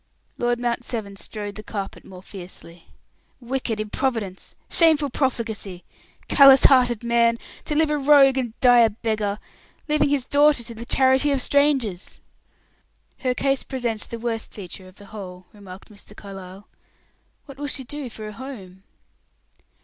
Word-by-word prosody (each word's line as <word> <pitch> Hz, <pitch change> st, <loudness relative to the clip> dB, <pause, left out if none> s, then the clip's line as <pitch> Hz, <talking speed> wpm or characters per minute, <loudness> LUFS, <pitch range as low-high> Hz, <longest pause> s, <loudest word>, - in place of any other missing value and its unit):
Lord 240 Hz, 0 st, 0 dB
Mount 240 Hz, 0 st, -2 dB
Severn 215 Hz, -5 st, -5 dB
strode 205 Hz, 0 st, -7 dB
the 215 Hz, -, -8 dB
carpet 200 Hz, -2 st, -6 dB
more 185 Hz, -1 st, -13 dB
fiercely. 175 Hz, -3 st, -11 dB, 0.5 s
"Wicked 245 Hz, -3 st, -3 dB
improvidence! 215 Hz, -3 st, -3 dB
Shameful 310 Hz, -4 st, +3 dB
profligacy; 220 Hz, -9 st, -3 dB, 0.4 s
callous 275 Hz, -2 st, +7 dB
hearted 245 Hz, -4 st, +5 dB
man! 235 Hz, 0 st, +2 dB, 0.3 s
To 300 Hz, -, -2 dB
live 310 Hz, 0 st, +2 dB
a 300 Hz, -, 0 dB
rogue 275 Hz, -2 st, +5 dB
and 240 Hz, -3 st, -5 dB
die 245 Hz, -1 st, +6 dB
a 230 Hz, -1 st, +6 dB
beggar 215 Hz, -2 st, -2 dB, 0.5 s
leaving 300 Hz, -1 st, +2 dB
his 280 Hz, -3 st, 0 dB
daughter 285 Hz, -3 st, +3 dB
to 235 Hz, -, -7 dB
the 230 Hz, +1 st, -9 dB
charity 265 Hz, +2 st, +3 dB
of 275 Hz, -, +1 dB
strangers!" 265 Hz, -10 st, +1 dB, 1.0 s
"Her 255 Hz, -2 st, -1 dB
case 275 Hz, 0 st, 0 dB
presents 240 Hz, -5 st, -4 dB
the 235 Hz, -, -6 dB
worst 230 Hz, -1 st, -4 dB
feature 185 Hz, -1 st, -10 dB
of 185 Hz, -, -17 dB
the 205 Hz, -, -14 dB
whole," 185 Hz, -3 st, -9 dB
remarked 195 Hz, -2 st, -13 dB
Mr. 210 Hz, 0 st, -15 dB
Carlyle. 195 Hz, 0 st, -10 dB, 0.8 s
"What 275 Hz, -2 st, -12 dB
will 290 Hz, -, -3 dB
she 275 Hz, -2 st, -4 dB
do 280 Hz, 0 st, -6 dB
for 215 Hz, -1 st, -8 dB
a 210 Hz, -, -8 dB
home?" 205 Hz, -7 st, -10 dB
235 Hz, 150 wpm, -23 LUFS, 205-270 Hz, 1.0 s, callous